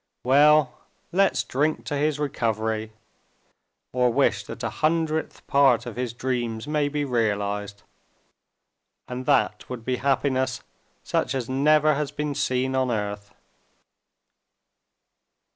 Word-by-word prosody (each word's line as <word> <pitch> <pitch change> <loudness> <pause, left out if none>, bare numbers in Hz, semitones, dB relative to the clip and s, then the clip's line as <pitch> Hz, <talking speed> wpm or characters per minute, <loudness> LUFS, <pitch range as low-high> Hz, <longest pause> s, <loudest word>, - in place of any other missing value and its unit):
"Well, 145 +1 +4 0.3
let's 195 +2 +2
drink 150 +4 -1
to 145 - -3
his 150 +1 0
recovery, 110 -6 -2 1.0
or 125 -1 +2
wish - - +2
that - - -8
a - - 0
hundredth 160 0 -1
part 135 -4 +4
of 120 - -7
his 125 -1 -3
dreams 120 -1 -3
may 150 -1 0
be 145 0 -2
realized—and 105 +2 -6
that 140 -3 +1
would 120 -3 -7
be 130 -1 0
happiness 130 -1 0 0.4
such 125 - -1
as 125 -3 -2
never 150 +3 +3
has 145 0 -2
been 150 0 -3
seen 130 -1 0
on 130 -1 +1
earth!" 105 -2 -3
130 Hz, 115 wpm, -25 LUFS, 115-145 Hz, 1.0 s, Well